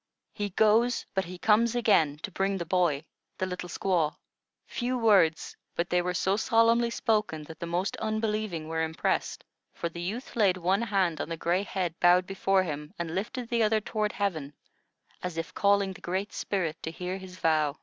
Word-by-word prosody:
He 205 -1 -3
goes; 220 +5 +3
but 190 -1 0
he 180 +1 -8
comes 220 +4 +3
again 165 -11 +3
to 200 - -4
bring 195 +2 0
the 170 - -4
boy, 165 -4 +1 0.3
the 185 - -1
little 180 -1 -5
squaw." 170 -4 0 0.5
Few 250 +1 -2
words, 195 -9 +3 0.2
but 170 - -2
they 180 0 +3
were 180 +1 -2
so 190 +3 +2
solemnly 230 +1 +3
spoken 215 -10 0
that 160 +1 -11
the 170 - -4
most 175 +3 -1
unbelieving 215 -6 -2
were 160 0 -1
impressed; 160 0 -1 0.3
for 170 - -3
the 170 +1 -7
youth 215 +9 -5
laid 200 -5 +3
one 185 +4 +1
hand 190 -8 +1
on - - -4
the 165 - -3
gray 175 +4 +1
head 185 -4 -2
bowed 180 +1 +5
before 195 0 +1
him, 150 -3 -6
and 170 -2 -4
lifted 230 +6 -3
the 235 -1 +1
other 220 0 +3
toward 215 0 -2
heaven, 155 -8 -2 0.7
as 180 -2 -4
if 165 - -4
calling 200 -1 +2
the - - -14
Great 190 +4 -3
Spirit 180 -6 -2
to - - -4
hear 180 +3 -5
his 185 -1 -10
vow. 155 -4 +1
185 Hz, 190 wpm, -28 LUFS, 170-210 Hz, 0.7 s, bowed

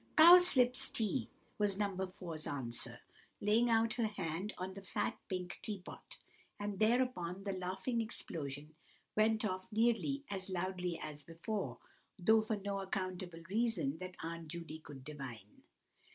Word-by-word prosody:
"Cowslip 320 -7 +9 0.2
tea," 225 +2 0 0.3
was 205 -2 +2
No. 200 -2 0
4's 180 -4 -4
answer, 125 -5 -4 0.4
laying 220 +4 +4
her 225 -1 +5 0.2
hand 190 -1 -3
on 185 +1 -4
the 195 - -8
fat 190 - -1
pink 180 -1 -3
tea 210 -2 -3
pot; 185 - -10 0.4
and 205 -1 -3
thereupon 215 -6 +2
the 200 - -1
laughing 190 +6 -1
explosion 150 - -5 0.4
went 215 +1 +3
off 185 -2 -3
nearly 235 +5 +2
as 190 -1 -3
loudly 180 -1 -1
as 150 -1 -6
before, 170 +6 -4 0.4
though 220 +4 +5
for 220 0 -1
no 200 -1 -3
accountable 185 -3 -3
reason 205 -8 0
that 185 -1 -7
Aunt 165 0 -5
Judy 160 -1 -6
could 140 -4 -11
divine. 130 -9 -8
190 Hz, 140 wpm, -36 LUFS, 170-215 Hz, 0.4 s, Cowslip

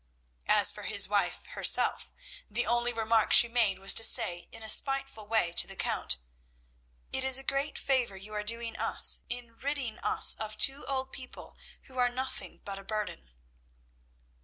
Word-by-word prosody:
As - - +5
for - - -11
his - - +1
wife - - -2
herself, - - +1 0.4
the 235 +4 0
only 240 +1 -1
remark 225 -1 0
she 235 - +7
made 230 -5 -1
was 195 +1 +1
to 225 - +2
say 175 -5 +4
in 225 - -13
a - - -8
spiteful 270 -3 +1
way 220 -6 0
to 170 - 0
the - - -10
Count 65 - -1 1.0
"It 265 - -2
is 265 -1 +4
a 270 - -6
great 275 +2 -4
favour 250 -7 -2
you 205 +3 -11
are 210 - -4
doing 230 +1 -3
us - - +5
in 240 -1 -7
ridding 275 -5 -5
us - - +5
of 215 -1 -7
two 270 +1 +1
old 265 -1 -4
people 255 -1 -12 0.3
who 260 -1 -11
are 245 0 +2
nothing 260 +2 -7
but 200 -2 -7
a - - -13
burden!" 195 - -7
230 Hz, 175 wpm, -28 LUFS, 215-260 Hz, 1.0 s, she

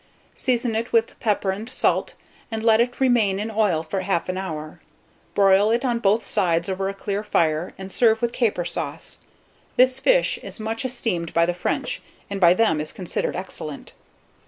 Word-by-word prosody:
Season 240 -2 -1
it 230 +2 -2
with 230 -1 +1
pepper 205 -4 0
and 210 +5 -6
salt, 260 - 0 0.3
and 220 -1 -4
let 225 0 +5
it 245 +1 -1
remain 230 -7 +3
in 215 +2 -3
oil 205 -7 +1
for 190 +4 -3
1/2 185 -1 -1
hour. 155 -5 -6 0.5
Broil 200 +1 +5
it 235 +4 +1
on 240 -2 +1
both 210 0 +2
sides 170 -4 +1
over 195 0 -2
a - - -4
clear 200 +1 -3
fire, 165 -5 0
and 190 0 -8
serve 225 0 +3
with 235 0 -1
caper 210 -8 0
sauce. - - -5 0.6
This 255 +1 +4
fish - - +3
is - - -7
much 225 +4 -3
esteemed 225 -10 -2
by 170 - +5
the 175 - 0
French, 180 - -2 0.3
and 200 -1 -3
by 175 0 +7
them 185 -8 +2
is 155 - -4
considered 180 -3 -3
excellent. 165 -5 -7
205 Hz, 180 wpm, -23 LUFS, 180-230 Hz, 0.6 s, by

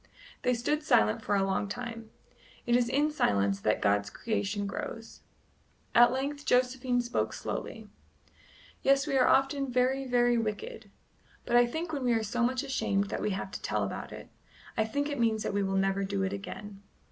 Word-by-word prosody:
They 250 0 +2
stood 295 +6 0
silent 105 - +3
for 205 - 0
a 195 - +2
long 195 +1 -1
time. 230 0 -6 0.6
It 240 - +3
is 245 -1 +2
in 290 +4 +2
silence 100 - +1
that 105 +2 0
God's 100 0 +2
creation 205 - -2
grows. 225 +3 -6 0.7
At 240 0 +7
length 280 +3 -3
Josephine 250 -1 +2
spoke 240 0 -1
slowly: - - -5 0.9
"Yes, 275 +1 +3
we 285 -3 -1
are 255 - +4
often 270 0 +2
very, 260 +2 +1
very 245 -1 +3
wicked; 225 - -4 0.6
but 240 - 0
I 240 0 +6
think 320 +6 -4
when 280 -3 -2
we 240 - +3
are 225 -1 +1
so 235 +3 -2
much 255 +2 +1
ashamed 200 -7 0
that - - -3
we - - 0
have 195 -1 -4
to - - -6
tell - - -1
about - - -5
it - - -10 0.5
I 220 - +1
think 285 +6 -1
it 285 -3 -4
means 225 -2 +1
that - - -2
we 205 - +1
will 195 0 0
never 195 +1 +1
do 195 0 -1
it 190 +1 -1
again." 200 0 -7
240 Hz, 190 wpm, -30 LUFS, 200-265 Hz, 0.9 s, At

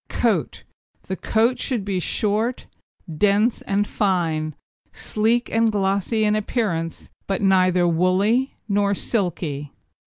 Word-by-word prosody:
COAT - - 0 0.4
The 190 - -4
coat 230 +6 +1
should 240 -7 -2
be 195 -2 -1
short, 215 +6 -1 0.5
hard, 155 -3 -8
dense 210 +3 +3
and 200 +1 0
fine, 165 -6 0 0.4
sleek 225 +3 0
and 225 0 +3
glossy 200 +2 0
in 210 0 +2
appearance, 200 -7 -2 0.2
but 195 0 -1
neither 185 -2 +4
woolly 190 +10 +2
nor 200 -1 +1
silky. 165 - -2
200 Hz, 120 wpm, -22 LUFS, 180-220 Hz, 0.5 s, neither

